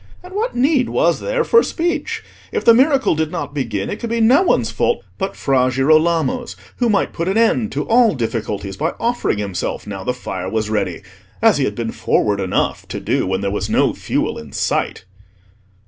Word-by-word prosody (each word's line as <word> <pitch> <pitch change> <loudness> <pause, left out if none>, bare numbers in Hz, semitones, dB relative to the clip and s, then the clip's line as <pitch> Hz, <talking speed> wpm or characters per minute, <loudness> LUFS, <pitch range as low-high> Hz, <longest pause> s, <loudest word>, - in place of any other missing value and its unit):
And 365 +1 -11
what 445 +5 -2
need 260 0 +2
was - - +2
there - - 0
for 465 0 +5
speech? 345 -4 -2 0.3
If 445 - -2
the 230 - +8
miracle 270 +3 +3
did 160 -1 -1
not 165 -4 -4
begin, 115 -9 -2
it 210 - -5
could 235 - -4
be 230 0 0
no 245 +8 +5
one's 375 - +1
fault 475 - 0 0.2
but 195 0 -2
Fra 130 -2 +2
Girolamo's, 160 - +2 0.2
who 240 -2 +1
might 205 - +1
put 170 +1 -3
an 195 +3 +1
end 230 0 +2
to - - -2
all 230 -4 +4
difficulties 105 -5 -3
by - - -2
offering 235 - 0
himself 100 -3 -3
now 100 -2 -6
the 125 - 0
fire 95 -7 -5
was 110 0 -2
ready, 100 -4 -2 0.4
as 220 -7 +4
he 135 - +2
had 105 - -3
been 115 0 -3
forward 100 -1 0
enough 95 -2 -1
to - - -5
do - - 0
when 95 +1 -1
there 100 0 -1
was 105 - -2
no - - +2
fuel - - -2
in 75 -2 -12
sight. - - -1
165 Hz, 200 wpm, -19 LUFS, -, 0.4 s, the